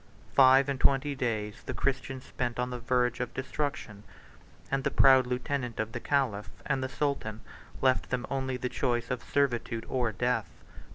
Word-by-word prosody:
Five 135 Hz, 0 st, +7 dB
and 140 Hz, -2 st, -2 dB
twenty 140 Hz, +2 st, +3 dB
days 110 Hz, -5 st, -2 dB
the -, -, -3 dB
Christians 135 Hz, -1 st, -2 dB
spent 120 Hz, -2 st, -3 dB
on 125 Hz, 0 st, -1 dB
the 125 Hz, -, -4 dB
verge 125 Hz, 0 st, +1 dB
of 125 Hz, -1 st, -4 dB
destruction; 130 Hz, -6 st, -3 dB, 0.7 s
and 135 Hz, 0 st, 0 dB
the -, -, +2 dB
proud 130 Hz, -2 st, +6 dB
lieutenant 125 Hz, -1 st, -2 dB
of 110 Hz, 0 st, -1 dB
the 120 Hz, -, -4 dB
caliph 120 Hz, -7 st, 0 dB, 0.2 s
and 135 Hz, -2 st, 0 dB
the 130 Hz, -, -2 dB
sultan 135 Hz, -7 st, -2 dB, 0.4 s
left 130 Hz, -1 st, +2 dB
them 125 Hz, -1 st, -1 dB
only 130 Hz, -1 st, -2 dB
the 125 Hz, -, -2 dB
choice 120 Hz, -1 st, -1 dB
of 125 Hz, -, -2 dB
servitude 120 Hz, -5 st, 0 dB
or 125 Hz, -3 st, 0 dB
death. 115 Hz, 0 st, 0 dB
125 Hz, 170 wpm, -29 LUFS, 120-135 Hz, 0.7 s, Five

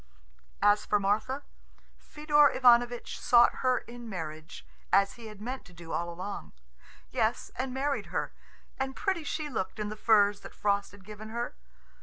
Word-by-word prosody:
As 205 Hz, 0 st, +5 dB
for 210 Hz, -, +2 dB
Martha, 215 Hz, +8 st, 0 dB, 0.6 s
Fedor 295 Hz, -1 st, +3 dB
Ivanovitch 245 Hz, -1 st, +3 dB
sought 240 Hz, 0 st, +5 dB
her 255 Hz, -1 st, +3 dB
in 240 Hz, -1 st, -8 dB
marriage, 155 Hz, -4 st, -7 dB, 0.3 s
as 195 Hz, 0 st, +4 dB
he 230 Hz, -2 st, -10 dB
had 215 Hz, -2 st, -11 dB
meant 250 Hz, +5 st, -5 dB
to 180 Hz, -, -16 dB
do 165 Hz, -1 st, -10 dB
all 170 Hz, 0 st, -1 dB
along 185 Hz, +4 st, -6 dB, 0.6 s
yes, 230 Hz, -2 st, 0 dB
and 260 Hz, 0 st, -3 dB
married 275 Hz, +2 st, -1 dB
her; -, -, -3 dB, 0.5 s
and 265 Hz, 0 st, -2 dB
pretty 380 Hz, -6 st, -1 dB
she 305 Hz, 0 st, -3 dB
looked 235 Hz, -6 st, -3 dB
in 210 Hz, -1 st, -3 dB
the 215 Hz, -, -5 dB
furs 205 Hz, -2 st, +4 dB
that -, -, -12 dB
Frost 200 Hz, -1 st, 0 dB
had 200 Hz, -2 st, -16 dB
given 215 Hz, +1 st, -9 dB
her. 235 Hz, +2 st, -3 dB
220 Hz, 165 wpm, -29 LUFS, 200-260 Hz, 0.6 s, As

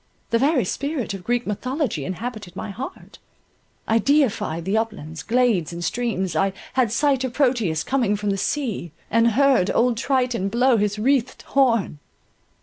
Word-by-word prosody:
The 230 Hz, -, +3 dB
very 275 Hz, -, +2 dB
spirit 280 Hz, -, -3 dB
of 195 Hz, -, -5 dB
the 180 Hz, -, -18 dB
Greek 245 Hz, 0 st, 0 dB
mythology 250 Hz, -, -2 dB
inhabited 205 Hz, -1 st, -6 dB
my 205 Hz, -, -5 dB
heart; 255 Hz, +7 st, -8 dB, 0.7 s
I 225 Hz, +1 st, +3 dB
deified 225 Hz, -, +1 dB
the 195 Hz, +3 st, 0 dB
uplands, 205 Hz, -8 st, -3 dB
glades, 230 Hz, -9 st, +1 dB
and 170 Hz, 0 st, -5 dB
streams, 190 Hz, -6 st, -1 dB
I 195 Hz, +4 st, +1 dB, 0.2 s
Had 250 Hz, -4 st, +2 dB
sight 270 Hz, +1 st, +2 dB
of 255 Hz, -2 st, -3 dB
Proteus 235 Hz, -, +1 dB
coming 240 Hz, -6 st, +1 dB
from 205 Hz, 0 st, -1 dB
the -, -, 0 dB
sea; 220 Hz, -, -2 dB, 0.2 s
And 230 Hz, 0 st, +4 dB
heard 270 Hz, -7 st, +4 dB
old 240 Hz, -1 st, +2 dB
Triton 250 Hz, -6 st, 0 dB
blow 245 Hz, +3 st, +3 dB
his 205 Hz, 0 st, 0 dB
wreathed 255 Hz, +2 st, 0 dB
horn. 230 Hz, -, +1 dB
230 Hz, 160 wpm, -23 LUFS, 195-255 Hz, 0.7 s, And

